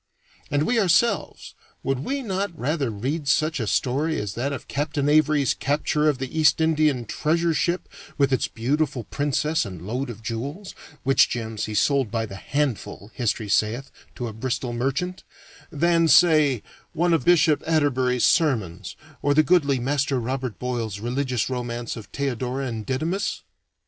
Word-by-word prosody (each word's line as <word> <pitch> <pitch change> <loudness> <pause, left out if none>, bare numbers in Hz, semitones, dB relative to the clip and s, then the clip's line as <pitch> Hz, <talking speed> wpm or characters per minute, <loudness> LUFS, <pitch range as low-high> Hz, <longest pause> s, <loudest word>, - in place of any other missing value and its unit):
And 145 +1 +1
we 235 +6 +2
ourselves 200 +2 +1 0.3
would 135 -1 0
we 275 - -3
not 195 -4 -3
rather 145 -1 -1
read 135 +8 -3
such 155 +2 +2
a 115 - -2
story 145 +9 0
as 105 -2 -4
that 130 +5 -2
of 140 - -6
Captain 145 0 -1
Avery's 150 -3 +3
capture 150 +2 +1
of 145 - 0
the 135 +4 -4
East 150 -1 +4
Indian 155 -6 +2
treasure 165 +8 0
ship, 175 +4 0 0.3
with 140 -2 +2
its 130 - +1
beautiful 135 +2 -1
princess 150 +5 0
and 95 -5 -7
load 125 +5 -3
of 115 -1 -9
jewels 140 - -5 0.3
(which 135 0 +4
gems 110 -3 -3
he 110 - -5
sold 135 +2 +2
by 115 0 -1
the 100 - -9
handful, 125 -4 -3
history 110 -3 -1
sayeth, 115 +6 0 0.2
to 125 - -4
a 110 - -6
Bristol 120 +2 -3
merchant), 140 +10 -2 0.5
than, 165 +1 +3
say, 155 - +5 0.3
one 175 +1 +2
of 160 -6 +2
Bishop 160 -2 +4
Atterbury's 130 -6 +2
sermons, 110 - +1 0.3
or 145 0 +2
the 155 - +6
goodly 145 -3 +3
Master 135 +1 0
Robert 125 -1 -3
Boyle's 115 -5 -3
religious 125 +1 -1
romance 120 -2 -4
of 110 -3 -9
"Theodora 135 -1 -3
and 115 -4 -5
Didymus"? 165 +9 -2
140 Hz, 160 wpm, -24 LUFS, 120-155 Hz, 0.5 s, the